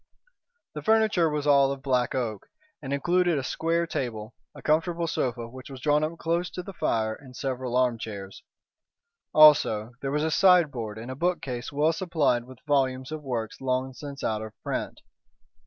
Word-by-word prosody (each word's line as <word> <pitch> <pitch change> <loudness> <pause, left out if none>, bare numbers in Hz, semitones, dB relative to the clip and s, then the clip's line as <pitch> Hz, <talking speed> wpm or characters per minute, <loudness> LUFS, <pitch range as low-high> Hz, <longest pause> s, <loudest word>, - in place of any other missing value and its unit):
The - - -5
furniture 215 -6 +3
was 150 -1 -2
all 140 -2 +5
of 135 -1 -6
black 125 -2 +1
oak, 110 -6 -3 0.3
and 135 -2 -6
included 175 +3 +2
a 135 - -2
square 165 +5 0
table, 115 -8 -4 0.2
a - - -11
comfortable 165 +2 +1
sofa 125 -7 -2
which 130 +3 -11
was 135 -1 -9
drawn 150 +3 +2
up 160 +2 -3
close 170 +2 -1
to 180 - -5
the 195 - -8
fire, 110 -9 0
and 130 +1 -13
several 130 -2 -2
arm 125 -2 +2
chairs. 100 -3 -7 0.9
Also 145 -8 +6
there 135 - -2
was 150 +2 0
a 160 - 0
sideboard 150 - +3
and 115 +3 -7
a - - -5
bookcase 135 -7 -2
well 150 +3 +2
supplied 160 -9 0
with 130 0 -13
volumes 130 -2 0
of 155 -1 -5
works 120 -5 -4
long 130 0 -1
since 140 +1 -8
out 110 -1 -1
of 110 -1 -7
print. - - -4
135 Hz, 175 wpm, -27 LUFS, 125-160 Hz, 0.9 s, Also